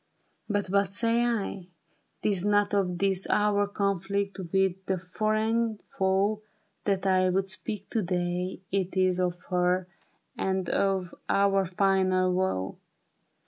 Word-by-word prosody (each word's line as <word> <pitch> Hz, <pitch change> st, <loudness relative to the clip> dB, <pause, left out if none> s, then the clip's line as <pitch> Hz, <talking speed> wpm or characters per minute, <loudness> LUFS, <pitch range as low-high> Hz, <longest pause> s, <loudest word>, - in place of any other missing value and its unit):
But 205 Hz, -1 st, 0 dB
what 200 Hz, -1 st, +2 dB
say 230 Hz, +2 st, +2 dB
I? 205 Hz, -6 st, -2 dB, 0.3 s
' -, -, -44 dB
Tis 195 Hz, -4 st, +1 dB
not 205 Hz, 0 st, +2 dB
of 185 Hz, -3 st, +1 dB
this 195 Hz, 0 st, 0 dB
Our 205 Hz, -1 st, +2 dB
conflict 200 Hz, 0 st, -1 dB
with 190 Hz, -1 st, +1 dB
the 190 Hz, -, +1 dB
foreign 215 Hz, +4 st, 0 dB, 0.2 s
foe, 195 Hz, +3 st, +1 dB, 0.4 s
That 195 Hz, -2 st, 0 dB
I 185 Hz, -1 st, +3 dB
would 190 Hz, +1 st, 0 dB
speak 205 Hz, +2 st, -3 dB
to 225 Hz, -, +1 dB
day 180 Hz, 0 st, -2 dB
— -, -, -43 dB
it 190 Hz, -1 st, -1 dB
is 185 Hz, -1 st, +3 dB
Of 180 Hz, -1 st, 0 dB
her 180 Hz, 0 st, +2 dB, 0.5 s
and 190 Hz, -1 st, -1 dB
of 190 Hz, -3 st, 0 dB, 0.2 s
our 195 Hz, -1 st, +3 dB
final 185 Hz, 0 st, +2 dB
woe. 180 Hz, -, -1 dB
195 Hz, 140 wpm, -28 LUFS, 185-205 Hz, 0.5 s, I